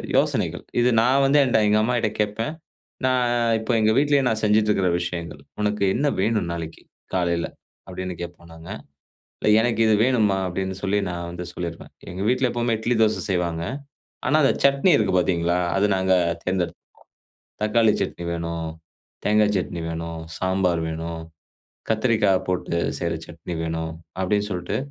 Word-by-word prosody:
யோசனைகள் -, -, +1 dB, 0.2 s
இது 120 Hz, +1 st, +4 dB
நான் 130 Hz, +4 st, +3 dB
வந்து 140 Hz, +2 st, +4 dB
என்ட்ட 120 Hz, -4 st, +3 dB
எங்க 105 Hz, +1 st, +4 dB
அம்மாகிட்ட 120 Hz, -1 st, +1 dB
கேப்பேன். 105 Hz, +7 st, -1 dB, 0.5 s
நான் 125 Hz, -1 st, +2 dB, 0.3 s
இப்ப 110 Hz, +1 st, -5 dB
எங்க 110 Hz, 0 st, +4 dB
வீட்லயே 145 Hz, -1 st, +3 dB
நான் 110 Hz, -2 st, 0 dB
செஞ்சுட்ருக்கிற 105 Hz, -3 st, +3 dB
விஷயங்கள், 85 Hz, -4 st, -5 dB, 0.2 s
“உனக்கு 105 Hz, 0 st, 0 dB
என்ன 145 Hz, +4 st, +1 dB
வேணும் 105 Hz, -3 st, +1 dB
நாளைக்கு 80 Hz, -1 st, -6 dB, 0.3 s
காலைல?” 85 Hz, -2 st, +1 dB, 0.4 s
அப்படின்னு 95 Hz, -1 st, -5 dB
கேட்போம் 85 Hz, -1 st, -8 dB
நாங்க. 80 Hz, 0 st, -11 dB, 0.7 s
“இல்லை, -, -, +2 dB
எனக்கு 115 Hz, -1 st, 0 dB
இது 110 Hz, -, +4 dB
வேணும்மா” 110 Hz, -6 st, +2 dB
அப்படின்னு 95 Hz, +1 st, -3 dB
சொல்லி 100 Hz, +1 st, +1 dB
நான் 85 Hz, -1 st, -4 dB
வந்து 90 Hz, +1 st, -6 dB
சொல்லிருவேன். 85 Hz, -1 st, -6 dB, 0.2 s
எங்க 90 Hz, +2 st, -5 dB
வீட்ல 125 Hz, +1 st, +2 dB
எப்பவுமே 120 Hz, -1 st, 0 dB
இட்லி 120 Hz, +2 st, 0 dB
தோசை 110 Hz, -1 st, +2 dB
செய்வாங்க. 85 Hz, -3 st, -1 dB, 0.6 s
ஆனா 145 Hz, -, +3 dB
அந்த -, -, +5 dB
சட்னி 140 Hz, +6 st, +4 dB
இருக்கு 100 Hz, -4 st, +1 dB
பாத்தீங்களா, 85 Hz, -1 st, +1 dB, 0.2 s
அது 100 Hz, +2 st, +3 dB
நாங்க 95 Hz, 0 st, +1 dB, 0.3 s
தேர்ந்தெடுத்துப்போம் 90 Hz, -2 st, -2 dB, 0.8 s
"தக்காளி 110 Hz, 0 st, +4 dB
சட்னி 85 Hz, -, -4 dB
வேணும், 85 Hz, -1 st, -3 dB, 0.6 s
தேங்கா 105 Hz, 0 st, +4 dB
சட்னி 85 Hz, -2 st, -3 dB
வேணும், 85 Hz, 0 st, -5 dB, 0.2 s
சாம்பார் 95 Hz, -2 st, +1 dB
வேணும், 80 Hz, +1 st, -5 dB, 0.7 s
கத்திரிக்காய் 110 Hz, -4 st, +2 dB
போட்டு 90 Hz, -2 st, -1 dB, 0.2 s
செய்ற 85 Hz, -1 st, -1 dB
சட்னி 85 Hz, +1 st, -7 dB
வேணும்" 80 Hz, 0 st, -3 dB, 0.3 s
அப்படின்னு 105 Hz, +2 st, +1 dB
சொல்ட்டு 90 Hz, -1 st, -2 dB
95 Hz, 145 wpm, -23 LUFS, 85-110 Hz, 0.8 s, அந்த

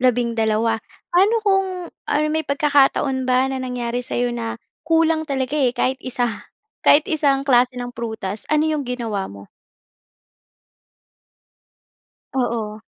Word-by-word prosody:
labindalawa. 230 Hz, -2 st, +1 dB, 0.3 s
Pa'no 390 Hz, +6 st, +4 dB
kung 385 Hz, -2 st, +3 dB, 0.4 s
or 295 Hz, -, +2 dB
may 315 Hz, -, +1 dB
pagkakataon 280 Hz, -2 st, +2 dB
ba 255 Hz, +1 st, +4 dB
na 265 Hz, -, -3 dB
nangyari 245 Hz, -1 st, -3 dB
sa'yo 245 Hz, 0 st, -1 dB
na, 230 Hz, -1 st, -4 dB, 0.2 s
kulang 320 Hz, -1 st, +2 dB
talaga 265 Hz, -1 st, -2 dB
eh, 250 Hz, -2 st, +1 dB
kahit 255 Hz, +1 st, 0 dB
isa 250 Hz, -1 st, -2 dB, 0.6 s
kahit 295 Hz, +1 st, +6 dB
isang 280 Hz, -4 st, +1 dB
klase 250 Hz, -1 st, +3 dB
ng 245 Hz, 0 st, -5 dB
prutas? 220 Hz, -3 st, -5 dB
Ano 305 Hz, 0 st, +3 dB
'yung 310 Hz, -2 st, 0 dB
ginawa 225 Hz, -6 st, -3 dB
mo? 100 Hz, 0 st, -11 dB, 2.9 s
Oo. 225 Hz, -4 st, -2 dB
255 Hz, 120 wpm, -21 LUFS, 235-290 Hz, 2.9 s, kahit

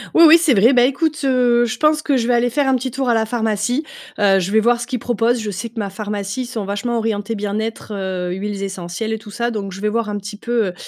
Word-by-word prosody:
Oui, 335 Hz, -, +8 dB
oui, 320 Hz, +2 st, +9 dB
c'est 325 Hz, -5 st, +3 dB
vrai. 230 Hz, +5 st, +5 dB
Bah 245 Hz, -1 st, +5 dB
écoute, 300 Hz, +4 st, 0 dB
heu, 245 Hz, -3 st, +3 dB
je 245 Hz, +1 st, -3 dB
pense 305 Hz, 0 st, +3 dB
que 280 Hz, -3 st, +2 dB
je 235 Hz, -2 st, -1 dB
vais 245 Hz, -, +3 dB
aller 240 Hz, +1 st, +1 dB
faire 285 Hz, +2 st, +1 dB
un 265 Hz, -, +3 dB
petit 255 Hz, +1 st, -2 dB
tour 260 Hz, 0 st, -2 dB
à 235 Hz, -, +3 dB
la 220 Hz, 0 st, +1 dB
pharmacie. 225 Hz, +3 st, -1 dB, 0.4 s
Heu, 200 Hz, -2 st, +4 dB
je 185 Hz, +1 st, -2 dB
vais 220 Hz, -, +4 dB
voir 235 Hz, +2 st, +2 dB
ce 240 Hz, -, -4 dB
qu'ils 250 Hz, 0 st, -3 dB
proposent. 235 Hz, +1 st, 0 dB
Je 220 Hz, -2 st, -4 dB
sais 205 Hz, +4 st, -5 dB
que 230 Hz, 0 st, -8 dB
ma 200 Hz, -2 st, -2 dB
pharmacie, 205 Hz, +2 st, -4 dB
ils -, -, -6 dB
sont 230 Hz, -4 st, -5 dB
vachement 205 Hz, +4 st, -2 dB
orientés 220 Hz, 0 st, -2 dB
bien-être, 215 Hz, +1 st, -4 dB
heu, 185 Hz, -2 st, -3 dB
huiles 200 Hz, +2 st, -4 dB
essentielles 190 Hz, +2 st, -4 dB
et 220 Hz, -, -1 dB
tout 210 Hz, -1 st, -12 dB
ça, 235 Hz, +3 st, -1 dB
donc 205 Hz, -4 st, -4 dB
je 190 Hz, +1 st, -8 dB
vais 210 Hz, -, +1 dB
voir 225 Hz, 0 st, -1 dB
un 205 Hz, -, -2 dB
petit 205 Hz, +1 st, -8 dB
peu, 230 Hz, -1 st, 0 dB
heu, 180 Hz, -, -4 dB
225 Hz, 280 wpm, -19 LUFS, 205-245 Hz, 0.4 s, oui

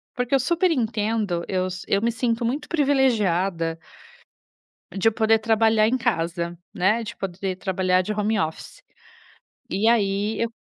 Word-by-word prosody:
porque 250 Hz, +1 st, 0 dB
eu -, -, +3 dB
super 340 Hz, +7 st, +1 dB
entendo, 220 Hz, -, -1 dB
eu 185 Hz, -1 st, -1 dB
si 185 Hz, 0 st, -7 dB
eu 200 Hz, -, +1 dB
me 235 Hz, +1 st, +1 dB
sinto 230 Hz, 0 st, -1 dB
muito 285 Hz, +5 st, -3 dB
privilegiada 200 Hz, -, +1 dB, 1.2 s
de 195 Hz, +3 st, +3 dB
poder 225 Hz, 0 st, +2 dB
trabalhar 220 Hz, 0 st, +3 dB
em 250 Hz, -, +1 dB
casa, 170 Hz, -7 st, -2 dB, 0.2 s
né, 210 Hz, +6 st, +2 dB
de 230 Hz, -, -8 dB
poder 190 Hz, 0 st, -4 dB
trabalhar 185 Hz, -1 st, +1 dB
de 215 Hz, +4 st, -3 dB
home 210 Hz, +1 st, 0 dB
office, 160 Hz, -1 st, -5 dB, 0.9 s
e 210 Hz, +4 st, +1 dB
aí, 205 Hz, -1 st, +1 dB
eu 230 Hz, -, +1 dB
215 Hz, 145 wpm, -23 LUFS, 185-235 Hz, 1.2 s, eu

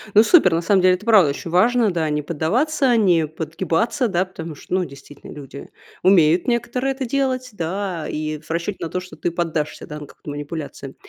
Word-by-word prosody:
Ну, 215 Hz, -, +8 dB
супер, 225 Hz, -, +5 dB
на 165 Hz, -, +1 dB
самом 190 Hz, +2 st, +3 dB
деле, 185 Hz, 0 st, +5 dB
это 210 Hz, -, -11 dB
правда 210 Hz, -9 st, +6 dB
очень 145 Hz, +4 st, -5 dB
важно, 230 Hz, +4 st, +3 dB
да, 160 Hz, -3 st, -1 dB
не 150 Hz, 0 st, -1 dB
поддаваться, 240 Hz, -, +1 dB
не 175 Hz, -7 st, +3 dB
подгибаться, 165 Hz, -, -1 dB
да, 185 Hz, -2 st, 0 dB
потому 165 Hz, -4 st, -8 dB
что, 160 Hz, -, -9 dB
ну, 185 Hz, -1 st, +1 dB
действительно, 140 Hz, 0 st, -13 dB
люди 140 Hz, -1 st, -10 dB, 0.3 s
умеют 175 Hz, -1 st, +4 dB
некоторые 250 Hz, +2 st, 0 dB
это 265 Hz, 0 st, -4 dB
делать, 255 Hz, 0 st, -1 dB
да, 175 Hz, -2 st, -3 dB
и 155 Hz, 0 st, -3 dB
в 155 Hz, -, -20 dB
расчете 170 Hz, +4 st, -2 dB
на -, -, -5 dB
то, 180 Hz, -, -2 dB
что 185 Hz, 0 st, -11 dB
ты 175 Hz, -, -2 dB
поддашься, 165 Hz, -3 st, -3 dB
да, 150 Hz, 0 st, -7 dB
на 150 Hz, -, -8 dB
какую-то -, -, -12 dB
манипуляцию. 145 Hz, -2 st, -7 dB
175 Hz, 200 wpm, -21 LUFS, 155-215 Hz, 0.3 s, Ну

